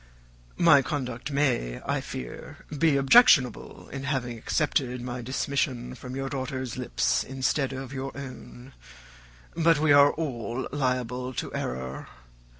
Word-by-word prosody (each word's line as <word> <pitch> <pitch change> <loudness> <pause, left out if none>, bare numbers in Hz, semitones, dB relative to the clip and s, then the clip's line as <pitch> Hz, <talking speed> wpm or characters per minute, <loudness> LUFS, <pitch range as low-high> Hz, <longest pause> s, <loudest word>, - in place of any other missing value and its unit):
My 160 -5 +6
conduct 130 -2 -4
may, 130 - 0
I - - 0
fear, 60 -2 -8
be 150 -1 +3
objectionable 135 - +4
in 135 0 -6
having 130 -4 -2
accepted 125 +1 -1
my 125 0 -5
dismission 130 0 -2
from 125 +1 -8
your 135 0 -3
daughter's 130 -2 -4
lips 125 -1 0
instead 135 +1 -1
of 135 0 -6
your 135 0 -4
own; 130 -1 -10 0.8
but 165 -1 +3
we 155 0 +3
are 145 0 +7
all 125 -5 -3
liable 125 -2 -2
to - - -4
error. 65 +1 -4
130 Hz, 130 wpm, -27 LUFS, 125-140 Hz, 0.8 s, are